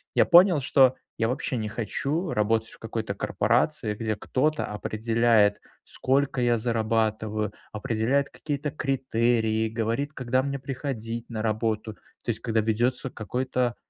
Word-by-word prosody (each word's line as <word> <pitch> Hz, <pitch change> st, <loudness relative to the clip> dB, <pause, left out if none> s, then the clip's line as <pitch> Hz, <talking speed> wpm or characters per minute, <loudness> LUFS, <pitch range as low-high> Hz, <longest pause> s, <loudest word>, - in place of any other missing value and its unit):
я -, -, +5 dB
понял, 175 Hz, -2 st, +7 dB
что 130 Hz, -1 st, +4 dB, 0.2 s
я 115 Hz, -, +1 dB
вообще 130 Hz, 0 st, -2 dB
не 110 Hz, -1 st, -2 dB
хочу 140 Hz, -, -2 dB
работать 110 Hz, +1 st, +1 dB
в -, -, -15 dB
какой-то 110 Hz, -2 st, -4 dB
корпорации, 115 Hz, +2 st, 0 dB
где 110 Hz, -1 st, -2 dB
кто-то 150 Hz, +8 st, 0 dB
определяет, 110 Hz, 0 st, +2 dB, 0.2 s
сколько 135 Hz, -1 st, 0 dB
я 120 Hz, -1 st, +3 dB
зарабатываю, 110 Hz, -2 st, 0 dB, 0.2 s
определяет 115 Hz, +6 st, 0 dB
какие-то 145 Hz, -1 st, -4 dB
критерии, 115 Hz, -6 st, +1 dB
говорит, 115 Hz, +6 st, -2 dB
когда 130 Hz, 0 st, 0 dB
мне 140 Hz, -1 st, -3 dB
приходить 125 Hz, -4 st, -5 dB
на 110 Hz, -2 st, -4 dB
работу. 110 Hz, -1 st, -1 dB, 0.3 s
То -, -, -4 dB
есть 110 Hz, -, -6 dB
когда 115 Hz, -2 st, +1 dB
ведётся 120 Hz, +4 st, 0 dB
какой-то 125 Hz, +2 st, -2 dB
115 Hz, 135 wpm, -26 LUFS, 110-130 Hz, 0.3 s, понял